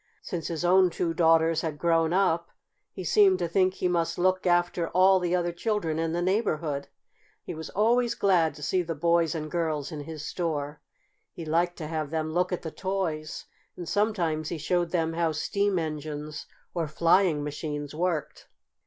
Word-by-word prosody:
Since 175 -5 -4
his 170 0 -3
own 185 +1 +5
two 170 0 -2
daughters 165 0 +3
had 155 -3 -3
grown 165 0 +2
up 170 -3 +1 0.4
he 185 - -7
seemed 190 +2 +5
to 175 -2 -1
think 185 +2 +2
he - - 0
must 170 -2 0
look 185 +1 +1
after 175 -1 +2
all 185 +2 +4
the 180 0 0
other 175 -1 0
children 170 -4 -1
in 165 0 -1
his 175 - 0
neighborhood. 165 -8 -1 0.6
He - - -6
was 160 0 -7
always 235 +4 +2
glad 170 -6 +2
to 150 - -10
see 180 +5 +1
the 165 -1 -4
boys 170 +1 +2
and 155 -1 -5
girls 160 -3 -1
in 155 - -5
his 150 0 -7
store. 150 -3 -3 0.5
He 165 - -8
liked 170 +3 +1
to 160 - -5
have 155 -2 -3
them 155 0 -2
look 180 +2 +1
at 180 - -3
the 160 - -5
toys, 170 -6 -3 0.3
and 175 - -7
sometimes 170 -8 0
he 170 - -3
showed 175 +3 0
them 165 -2 0
how 165 -1 0
steam 200 +5 0
engines 150 -1 -5 0.3
or 170 -3 -1
flying 165 0 +3
machines 145 0 -5
worked. 165 -1 -2
170 Hz, 180 wpm, -27 LUFS, 155-180 Hz, 0.6 s, own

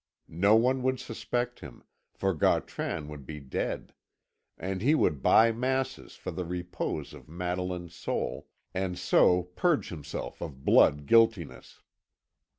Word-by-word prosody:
No 100 +2 +6
one 130 +3 +3
would 130 0 0
suspect 120 +2 -3
him, 65 -5 -11 0.3
for 95 -1 -1
Gautran 75 -1 0
would 75 -2 -9
be 75 +2 -7
dead; 65 -2 -4 0.6
and 95 0 -4
he 145 +8 +4
would 75 - +1
buy 115 - +6
masses 130 +3 -2
for - - -6
the 90 - -4
repose 90 -4 -4
of - - -13
Madeline's 90 0 -4
soul, 85 - -3 0.3
and 95 -1 -2
so 90 0 +4
purge 145 - 0
himself 75 -4 -6
of 70 -5 -7
blood 75 0 +5
guiltiness. 115 -3 +2
90 Hz, 135 wpm, -29 LUFS, 80-115 Hz, 0.6 s, No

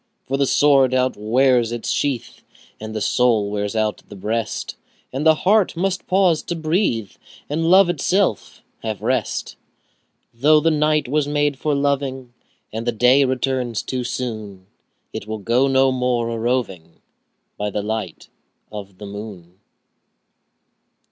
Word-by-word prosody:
For 135 - -2
the 140 0 +1
sword 135 -3 +4
outwears 125 0 +2
its 120 -1 -3
sheath, 135 -5 -2
5 - - -27 0.4
And 110 0 -7
the 110 - -2
soul 110 -3 +2
wears 105 +1 -3
out 110 -1 -1
the - - -10
breast, 110 +3 -3 0.4
And 140 +4 0
the 160 - +6
heart 195 +1 +2
must 185 +1 -1
pause 185 -4 +3
to 170 - -4
breathe, 155 - 0 0.4
And 165 +3 -1
love 190 +1 +7
itself 175 - 0 0.2
have 110 -2 -5
rest. 130 +3 -2 0.8
Though 150 +6 +4
the 165 +2 +2
night 150 -2 +1
was 145 +2 0
made 145 -1 0
for 150 -2 0
loving, 135 -3 -1 0.4
And 115 +2 -4
the - - +3
day 125 +5 +4
returns 130 -3 -1
too 130 -1 -3
soon, 110 -6 -5
10 95 - -32 0.5
Yet 100 - -6
we'll 110 0 -4
go 120 +6 +1
no 135 0 +3
more 125 -2 0
a 115 - -3
roving 110 -9 -2 0.6
By 105 0 -3
the 105 0 -3
light 110 -5 -4 0.4
of 100 -3 -9
the 105 - -9
moon. 100 -3 -9
125 Hz, 150 wpm, -21 LUFS, 110-145 Hz, 0.8 s, love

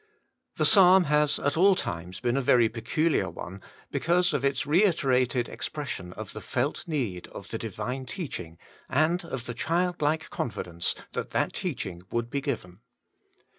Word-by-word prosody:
The - - +3
psalm 190 -3 +7
has 150 -1 +2
at 145 - 0
all 190 +4 +6
times 90 - -4
been 120 0 0
a 135 - +2
very 120 -2 +5
peculiar 125 +9 0
one, 95 +3 -8 0.3
because 175 +1 +2
of 140 -2 0
its 140 -1 +1
reiterated 140 - +3
expression 130 -12 -5
of 110 0 -8
the 110 - -7
felt 135 - -2
need 120 - -2
of 100 - -10
the 115 - -4
Divine 115 +5 -4
teaching, 90 - -6 0.3
and 160 +6 +2
of 130 -7 -5
the 120 - -4
childlike 160 +1 0
confidence 85 -7 -2 0.2
that - - -3
that - - +1
teaching 85 0 -4
would 120 0 -2
be 140 - -1
given. 110 -11 -4
135 Hz, 155 wpm, -27 LUFS, 110-160 Hz, 0.3 s, psalm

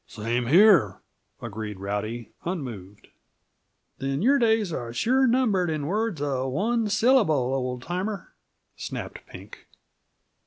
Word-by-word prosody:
"Same 115 +2 -2
here," 170 - +5 0.4
agreed 110 -3 -6
Rowdy, 105 +4 -4
unmoved. 115 - -6 0.9
"Then 135 +4 -2
your 275 +4 +4
days 220 -6 +2
are 120 -5 -4
sure 260 - +2
numbered 225 -8 +2
in 155 -2 -2
words 210 0 -1
uh 135 -3 -1
one 215 - 0
syllable, 205 - +3
old 125 -2 -3
timer," 190 +5 -4 0.4
snapped - - -6
Pink. - - -13
155 Hz, 115 wpm, -25 LUFS, -, 0.9 s, here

